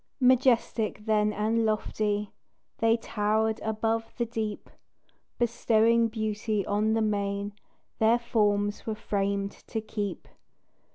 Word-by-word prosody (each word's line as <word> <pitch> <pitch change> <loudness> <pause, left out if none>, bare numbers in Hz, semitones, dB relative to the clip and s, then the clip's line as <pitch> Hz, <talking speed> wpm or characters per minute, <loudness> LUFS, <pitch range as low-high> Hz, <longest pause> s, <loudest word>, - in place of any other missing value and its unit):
Majestic 245 -4 +2
then 210 -1 +2
and 220 +2 0
lofty 210 -1 -1 0.5
They 225 0 +4
towered 220 0 0
above 225 +1 -1
the 240 - 0
deep, 220 -2 -4 0.7
Bestowing 230 -1 +3
beauty 215 -2 -2
on 210 +2 +1
the 225 0 +2
main 200 -1 -1 0.5
Their 225 +2 +5
forms 205 -3 0
were 220 - -1
framed 200 -1 -1
to 225 - -6
keep. 210 -3 -5
220 Hz, 110 wpm, -28 LUFS, 210-225 Hz, 0.7 s, Their